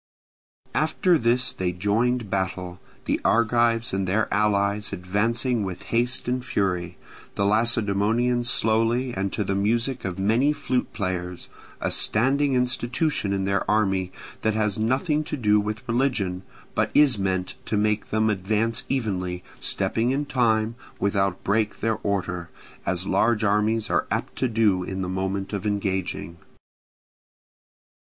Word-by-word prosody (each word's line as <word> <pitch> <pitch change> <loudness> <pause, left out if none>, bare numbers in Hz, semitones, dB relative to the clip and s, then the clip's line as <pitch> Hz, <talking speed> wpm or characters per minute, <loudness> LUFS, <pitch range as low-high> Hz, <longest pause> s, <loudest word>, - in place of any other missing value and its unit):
After 165 +4 +2
this 120 +2 +2
they 90 -1 -1
joined 105 +4 0
battle, 95 -2 -2 0.3
the - - 0
Argives 115 0 +2
and 95 -1 -1
their 105 +4 +1
allies 100 0 +1
advancing 110 +6 0
with 95 -2 -5
haste 120 +2 0
and 125 0 -1
fury, 90 -7 -1 0.4
the 100 - +1
Lacedaemonians 115 +2 +2
slowly 115 +3 +2
and 95 0 -2
to 105 - -1
the 100 - -1
music 115 +6 0
of 95 -1 -4
many 115 +9 +2
flute 130 -3 -2
players—a 90 -4 -5
standing 135 +5 +2
institution 125 -1 0
in 95 -1 0
their 100 0 +1
army, 95 -3 +1 0.3
that 110 -1 +1
has 105 -2 0
nothing 140 +7 +1
to 150 - -3
do 105 -4 +3
with 110 +4 -4
religion, 115 -7 0 0.3
but - - +1
is 140 -7 +5
meant 95 -1 -1
to 105 - -1
make 105 0 0
them 110 0 +2
advance 110 +3 0
evenly, 90 -9 -2 0.2
stepping 115 +2 0
in 140 +3 0
time, 115 -5 +1 0.2
without 100 -2 0
break 105 +1 0
their 110 0 0
order, 90 -4 -2 0.4
as 95 0 +1
large 110 +2 +2
armies 105 +2 +1
are - - +1
apt - - -3
to 130 - +1
do 110 -5 +2
in 95 +1 -4
the - - -3
moment 95 +2 -3
of 100 0 -2
engaging. 95 -4 -2
105 Hz, 140 wpm, -24 LUFS, 95-120 Hz, 0.4 s, is